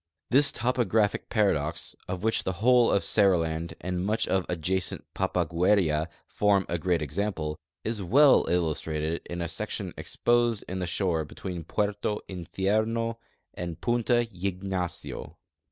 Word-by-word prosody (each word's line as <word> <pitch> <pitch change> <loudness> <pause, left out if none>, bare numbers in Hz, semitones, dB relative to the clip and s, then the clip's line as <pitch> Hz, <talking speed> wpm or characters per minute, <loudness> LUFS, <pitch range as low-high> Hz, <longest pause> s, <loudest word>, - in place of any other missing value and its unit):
This 140 +3 +5
tojiographic 110 -4 +1
paradox, 85 -9 0
of 95 +1 -4
which 110 0 +1
the 95 - -1
wh(fie 120 +5 +4
of 100 - +1
Seriland 85 -5 +2
and 90 0 -2
much 105 +3 0
of 95 -1 0
adjacent 90 +2 -1
Pa))agueria 85 -2 +2 0.2
form 100 -2 +2
a 85 - -1
great 85 -1 +1
example, 75 0 -2 0.2
is 110 -2 -2
well 135 +10 +5
illustrated 80 -1 -1
in 85 0 -3
a - - -2
section 80 - -4
exposed 120 -2 +1
in 95 +1 -4
the 90 - -2
shore 85 -2 0
between 85 +3 -6
Puerta 105 +2 -1
Iidiermj 110 +5 -1 0.4
and 85 -2 -5
Punta 120 0 +2
Ygnacio. 90 -1 -4
95 Hz, 130 wpm, -28 LUFS, 85-110 Hz, 0.4 s, This